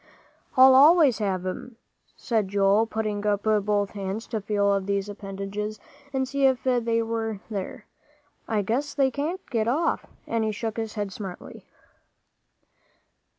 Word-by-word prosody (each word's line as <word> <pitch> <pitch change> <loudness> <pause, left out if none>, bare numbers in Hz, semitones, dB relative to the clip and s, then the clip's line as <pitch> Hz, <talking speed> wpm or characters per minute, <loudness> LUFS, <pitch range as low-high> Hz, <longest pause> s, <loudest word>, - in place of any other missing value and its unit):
"I'll 260 +1 +9
always 290 -2 +6
have 190 -3 -1
'em," 225 +6 -5 0.4
said 220 -4 -1
Joel, 200 +3 +3
putting 215 -2 -2
up 205 -1 +1
both 210 -2 +1
hands 200 +2 -4
to 220 -3 -2
feel 200 0 +1
of 195 -1 -1
these 200 0 0
appendages 205 +1 -5 0.3
and 265 -1 -1
see 275 +1 +2
if 260 -2 0
they 235 -3 +1
were 225 -2 -3
there. 210 +2 -5 0.6
"I 215 -2 0
guess 255 +9 -2
they 270 -2 +3
can't 315 +8 -3
get 225 -3 0
off," 300 +8 0 0.2
and 230 -1 -1
he 220 - 0
shook 220 +1 -4
his 225 -1 -4
head 205 -2 -3
smartly. 190 -2 -9
215 Hz, 150 wpm, -25 LUFS, 200-245 Hz, 0.6 s, I'll